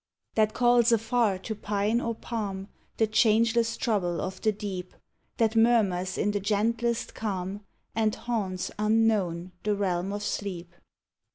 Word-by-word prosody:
That 215 -1 +2
calls 240 -1 +4
afar 225 -2 +2
to 190 +4 -5
pine 210 +2 0
or 230 -1 -2
palm 205 -4 -4 0.3
The 220 - +4
changeless 225 +1 +3
trouble 190 -8 0
of 185 0 -4
the 215 - +3
deep; 195 -3 -6 0.4
That 225 -1 +2
murmurs 200 -6 +3
in 210 - +1
the 205 - -1
gentlest 230 +4 0
calm, 195 -2 -3 0.3
And 220 -1 +1
haunts, 200 -6 -3
unknown, 210 -5 +1
the 210 -1 0
realm 190 -1 -1
of 205 0 -4
sleep. 185 -4 -4
210 Hz, 135 wpm, -27 LUFS, 190-225 Hz, 0.4 s, calls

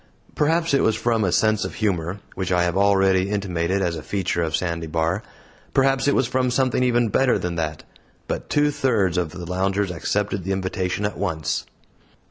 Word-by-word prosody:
Perhaps 165 +1 +1
it 140 - +4
was 110 - +2
from 115 -1 +1
a 95 - +1
sense 110 +2 +2
of - - -5
humor, 95 -2 -1
which 95 -1 -3
I 90 -1 +3
have 85 0 0
already 95 -1 +3
intimated 95 -2 -1
was 85 -2 0
a 80 - -6
feature 90 0 -1
of 80 -1 0
Sandy 85 -2 -2
Bar 80 +5 0 0.5
perhaps 135 0 +3
it 145 - +3
was 130 - +3
from 130 +1 0
something 130 0 +1
even 120 -2 +2
better 130 +3 +3
than 90 -1 -3
that; 75 -2 -3 0.4
but - - -4
two 145 0 +3
thirds 115 - +1
of 90 -3 0
the 90 +1 -8
loungers 95 +2 0
accepted 100 +3 -2
the 95 +2 -1
invitation 95 +1 -2
at 105 - -3
once. 80 -6 -2
95 Hz, 190 wpm, -23 LUFS, 90-115 Hz, 0.5 s, it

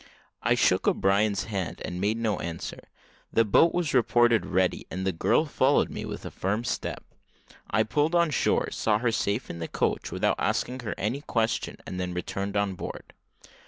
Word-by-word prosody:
I - - +3
shook - - +2
O'Brien's 100 +1 +2
hand, 100 -5 -4
and 90 +1 -5
made 105 +3 +1
no 110 -4 0
answer 85 -1 -6 0.4
the 115 - +3
boat 160 +11 +5
was 175 -5 -1
reported 120 -2 +4
ready, 95 -1 0
and 95 0 -4
the 95 - +2
girl 90 - +2
followed 140 -1 +2
me - - -5
with - - -6
a - - -5
firm 105 +5 -1
step. - - -3 0.7
I 110 - +3
pulled 150 +9 +1
on 170 -2 +3
shore, - - +1
saw 105 -2 +1
her 115 +1 +1
safe 105 +2 -1
in 85 - -7
the 80 - -3
coach, - - -1
without - - 0
asking 130 +1 -1
her 115 -4 -4
any 115 +8 -2
question, 115 -5 -1
and 90 - -5
then 90 -1 -3
returned 100 +3 -3
on 100 -1 +1
board. 90 - -8
105 Hz, 185 wpm, -27 LUFS, 95-120 Hz, 0.7 s, boat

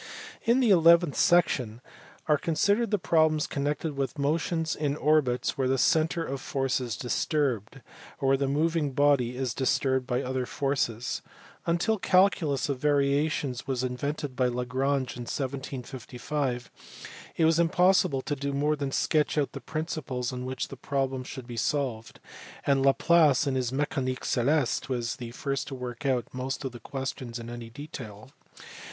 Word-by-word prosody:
In 240 +3 +4
the 235 -5 +4
eleventh 170 -3 +6
section 135 - +2 0.5
are 150 -2 +3
considered 200 +9 +1
the 210 - +2
problems 155 -4 +2
connected 145 +2 -2
with 135 +1 -2
motion 160 +3 0
in 145 -2 0
orbits 140 -4 +1
where 130 - +2
the 135 +1 +2
centre 160 +4 +2
of 135 0 -4
force 135 -2 -1
is 120 -5 -4
disturbed, 130 - -1 0.4
or 135 -2 +1
where 135 - +4
the 140 0 0
moving 150 0 0
body 130 -3 +2
is 130 -3 -1
disturbed 130 -1 +1
by 125 -1 0
other 130 -1 -2
forces. 130 -4 -1 0.5
Until 175 +7 +1
the - - -7
calculus 180 -7 +3
of 140 -3 -2
variations 140 -2 +1
was 130 -2 -1
invented 135 +2 -3
by 125 0 +2
Lagrange 130 +2 -1
in - - -6
1755 130 -1 -4 0.7
it 165 - +4
was 165 +1 +4
impossible 170 -5 +3
to 145 - -2
do 140 0 -3
more 150 +2 +1
than 140 -2 -3
sketch 155 +2 +1
out 145 -2 +1
the 135 - -8
principles 135 -4 -3
on 125 0 -5
which 130 -1 -3
the - - -7
problem 135 -1 -2
should 130 -1 -8
be 120 -1 -8
solved, 125 -3 -2 0.5
and 135 -1 +3
Laplace 150 +1 +4
in 140 - 0
his 130 -2 0
Mecanique 135 -2 -2
celeste 135 +2 +1
was 120 -2 -2
the 120 -3 -6
first 135 +3 -3
to 135 - -5
work 125 +2 -5
out 125 -3 +1
most 130 +2 -4
of 135 - -3
the 120 - -10
questions 130 -3 -5
in 120 0 -7
any 120 -1 -7
detail. 125 -4 -9
135 Hz, 160 wpm, -28 LUFS, 125-150 Hz, 0.7 s, eleventh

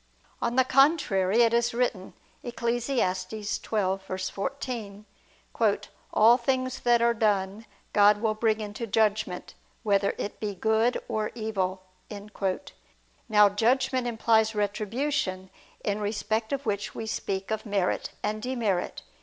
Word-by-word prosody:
On 235 +1 -1
the 260 - +5
contrary, 250 - +3
It 230 0 +3
is 235 0 +1
written 230 -6 -1 0.3
(Eccles. 240 -1 -2
12:14): 205 +1 -2 1.1
"All 230 +3 +6
things 255 +1 -1
that 240 -1 +3
are 235 0 +4
done, 210 -1 0 0.3
God 205 0 +5
will 220 0 +1
bring 220 0 +1
into 210 +2 -5
judgment... 215 -3 0 0.3
whether 200 -2 +2
it 205 - -5
be 205 -2 -3
good 220 +4 +2
or 215 -1 -1
evil." 195 -5 -2 1.5
Now 210 -1 +7
judgment 245 +4 +1
implies 220 -1 +2
retribution, 205 -1 -2 0.3
in 205 0 -1
respect 220 +1 -2
of 280 0 -2
which 200 -2 -2
we 225 - -4
speak 195 -2 -3
of 220 0 -1
merit 200 -3 0
and 215 +1 -2
demerit. 220 -7 -2
220 Hz, 120 wpm, -27 LUFS, 200-235 Hz, 1.5 s, Now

